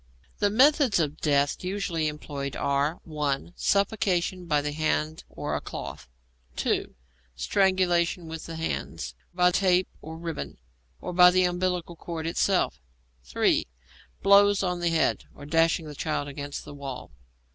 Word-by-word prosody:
The 205 Hz, -, +3 dB
methods 265 Hz, -, +4 dB
of 155 Hz, -1 st, -1 dB
death 145 Hz, 0 st, +1 dB
usually 180 Hz, -4 st, -1 dB
employed 145 Hz, -3 st, -5 dB
are 140 Hz, +3 st, 0 dB
(1) 150 Hz, 0 st, -2 dB
Suffocation 185 Hz, -3 st, 0 dB
by 150 Hz, -3 st, +3 dB
the 145 Hz, 0 st, -2 dB
hand 155 Hz, +1 st, -1 dB
or -, -, -4 dB
a -, -, -2 dB
cloth. -, -, -7 dB, 0.5 s
(2) -, -, -1 dB, 0.4 s
Strangulation 175 Hz, -, +1 dB
with 160 Hz, 0 st, -7 dB
the 165 Hz, -, -6 dB
hands, 160 Hz, -, -4 dB, 0.2 s
by 180 Hz, 0 st, +4 dB
a -, -, -2 dB
tape 185 Hz, 0 st, +3 dB
or 160 Hz, +1 st, -8 dB
ribbon, 165 Hz, -2 st, -5 dB, 0.4 s
or -, -, -5 dB
by 180 Hz, 0 st, +8 dB
the 185 Hz, +1 st, +3 dB
umbilical 180 Hz, -1 st, -1 dB
cord 165 Hz, -1 st, -6 dB
itself. 170 Hz, -, +1 dB, 0.4 s
(3) -, -, +1 dB, 0.6 s
Blows 200 Hz, 0 st, +6 dB
on 180 Hz, -1 st, -1 dB
the 175 Hz, 0 st, +1 dB
head, 160 Hz, -4 st, +1 dB
or 145 Hz, -, -10 dB
dashing 165 Hz, +2 st, +2 dB
the 150 Hz, -, -7 dB
child 145 Hz, 0 st, -2 dB
against 145 Hz, 0 st, -6 dB
the -, -, -9 dB
wall. 135 Hz, -, -7 dB
165 Hz, 145 wpm, -27 LUFS, 150-185 Hz, 0.6 s, by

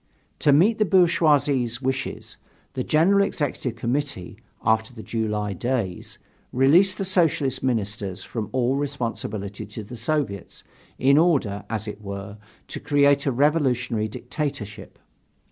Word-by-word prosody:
To 145 Hz, -, +4 dB
meet 195 Hz, +11 st, +4 dB
the -, -, +5 dB
bourgeoisie's 145 Hz, -, +3 dB
wishes, 135 Hz, 0 st, -4 dB, 0.4 s
the 130 Hz, -, -2 dB
General 190 Hz, +8 st, +4 dB
Executive 140 Hz, -, -2 dB
Committee, 120 Hz, -3 st, -3 dB, 0.3 s
after 110 Hz, +1 st, +2 dB
the 110 Hz, -, -9 dB
July 105 Hz, -3 st, -2 dB
days, 110 Hz, -3 st, -3 dB, 0.3 s
released 165 Hz, +9 st, +4 dB
the 195 Hz, -, -2 dB
Socialist 155 Hz, -8 st, +1 dB
Ministers 105 Hz, -6 st, -2 dB
from 110 Hz, -4 st, -5 dB
all 130 Hz, +1 st, +1 dB
responsibility 115 Hz, -8 st, -4 dB
to 110 Hz, -, -7 dB
the 110 Hz, +4 st, -9 dB
Soviets, 115 Hz, -, -3 dB, 0.3 s
in 140 Hz, +3 st, +4 dB
order, 135 Hz, -, +1 dB
as 110 Hz, -1 st, -3 dB
it 105 Hz, 0 st, -7 dB
were, 100 Hz, +1 st, -7 dB, 0.3 s
to -, -, -5 dB
create 140 Hz, 0 st, +3 dB
a -, -, +3 dB
revolutionary 125 Hz, -5 st, +1 dB
dictatorship. 110 Hz, -3 st, -6 dB
130 Hz, 130 wpm, -24 LUFS, 110-145 Hz, 0.4 s, the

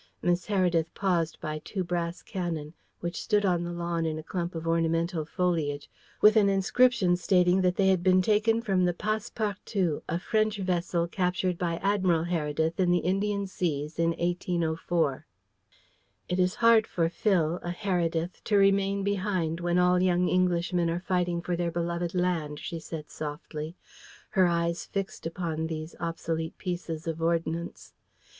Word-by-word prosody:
Miss 175 Hz, 0 st, +1 dB
Heredith 175 Hz, -5 st, +1 dB
paused 175 Hz, -5 st, 0 dB
by 155 Hz, 0 st, -4 dB
two 190 Hz, -3 st, -3 dB
brass 175 Hz, -1 st, -3 dB
cannon, 165 Hz, -5 st, -4 dB, 0.3 s
which 170 Hz, +1 st, -3 dB
stood 210 Hz, -2 st, +2 dB
on 175 Hz, -2 st, +2 dB
the 175 Hz, -, -4 dB
lawn 170 Hz, -1 st, -2 dB
in 160 Hz, -1 st, -1 dB
a 155 Hz, -, -6 dB
clump 175 Hz, +1 st, -4 dB
of 165 Hz, 0 st, -5 dB
ornamental 165 Hz, 0 st, +1 dB
foliage, 160 Hz, -5 st, -1 dB, 0.3 s
with 215 Hz, +1 st, +7 dB
an 200 Hz, -2 st, +5 dB
inscription 195 Hz, 0 st, +3 dB
stating 180 Hz, 0 st, +3 dB
that 180 Hz, -1 st, +2 dB
they 190 Hz, -1 st, +3 dB
had 185 Hz, -2 st, +3 dB
been 185 Hz, 0 st, +4 dB
taken 220 Hz, +3 st, +2 dB
from 190 Hz, -5 st, +2 dB
the 175 Hz, -1 st, +1 dB
Passe 215 Hz, +2 st, -2 dB
partout, 200 Hz, -6 st, -1 dB
a 165 Hz, -, 0 dB
French 215 Hz, +3 st, 0 dB
vessel 175 Hz, -2 st, 0 dB
captured 180 Hz, 0 st, 0 dB
by 170 Hz, -2 st, 0 dB
Admiral 185 Hz, -5 st, +2 dB
Heredith 160 Hz, -1 st, -1 dB
in 180 Hz, -2 st, +3 dB
the 175 Hz, -, +4 dB
Indian 200 Hz, +2 st, 0 dB
Seas 155 Hz, -5 st, -3 dB
in 165 Hz, 0 st, +3 dB
1804. 170 Hz, -4 st, -1 dB, 1.0 s
"It 180 Hz, +1 st, 0 dB
is 180 Hz, 0 st, +2 dB
hard 230 Hz, -1 st, +5 dB
for 165 Hz, -2 st, 0 dB
Phil, 175 Hz, -2 st, +1 dB
a 175 Hz, -, -5 dB
Heredith, 175 Hz, -2 st, -1 dB
to 210 Hz, -, +3 dB
remain 195 Hz, 0 st, +3 dB
behind 185 Hz, -5 st, -1 dB
when 175 Hz, 0 st, 0 dB
all 180 Hz, 0 st, +4 dB
young 180 Hz, -1 st, +2 dB
Englishmen 175 Hz, -1 st, +1 dB
are 170 Hz, +1 st, -1 dB
fighting 180 Hz, -2 st, -1 dB
for 175 Hz, 0 st, -1 dB
their 170 Hz, 0 st, -1 dB
beloved 170 Hz, +1 st, -2 dB
land," 170 Hz, -5 st, 0 dB
she 165 Hz, -, -5 dB
said 155 Hz, -1 st, -8 dB
softly, 155 Hz, +1 st, -6 dB, 0.5 s
her 185 Hz, -3 st, +4 dB
eyes 170 Hz, 0 st, 0 dB
fixed 195 Hz, -4 st, -4 dB
upon 165 Hz, -2 st, -3 dB
these 160 Hz, 0 st, -6 dB
obsolete 165 Hz, -1 st, -3 dB
pieces 175 Hz, -2 st, -4 dB
of 165 Hz, -1 st, -3 dB
ordnance. 165 Hz, 0 st, -2 dB
175 Hz, 160 wpm, -28 LUFS, 165-185 Hz, 1.0 s, with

